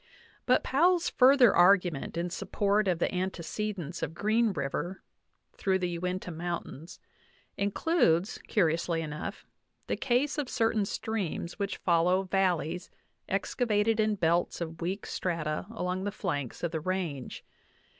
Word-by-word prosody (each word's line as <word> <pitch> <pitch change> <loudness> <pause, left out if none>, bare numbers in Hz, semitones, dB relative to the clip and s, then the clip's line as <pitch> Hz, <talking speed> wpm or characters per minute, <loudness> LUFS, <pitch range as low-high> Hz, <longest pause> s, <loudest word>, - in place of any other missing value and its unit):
But 250 - +4
Powell's 340 +5 +3
further 255 -3 +6
argument 175 -4 +3
in 175 +1 -2
support 200 +2 0
of 180 -3 +2
the 170 - +1
antece 190 +3 -3
dence 170 -2 -6
of 160 - -3
Green 220 +3 +2
River 175 +3 -3 0.5
through 190 -1 +1
the 175 -2 -2
Uinta 180 0 -3
Mountains 170 -1 -6 0.6
includes, 200 - +1
curiously 165 -3 +1
enough, 155 +6 -6 0.4
the - - -1
case 275 +4 +1
of 275 -4 -2
certain 225 -4 +1
streams 195 -4 -3
which 200 -1 -2
follow 180 +1 +2
val 190 -2 +2
leys 160 +4 -5 0.4
excavated 220 -2 +1
in 215 -1 +2
belts 170 -2 +1
of 165 -1 -6
weak 190 +4 -3
strata 165 -2 -2
along 185 -4 -3
the 205 - -1
flanks 145 - -4
of 170 - 0
the 160 - -2
range. 170 -7 -3
185 Hz, 135 wpm, -29 LUFS, 170-210 Hz, 0.6 s, further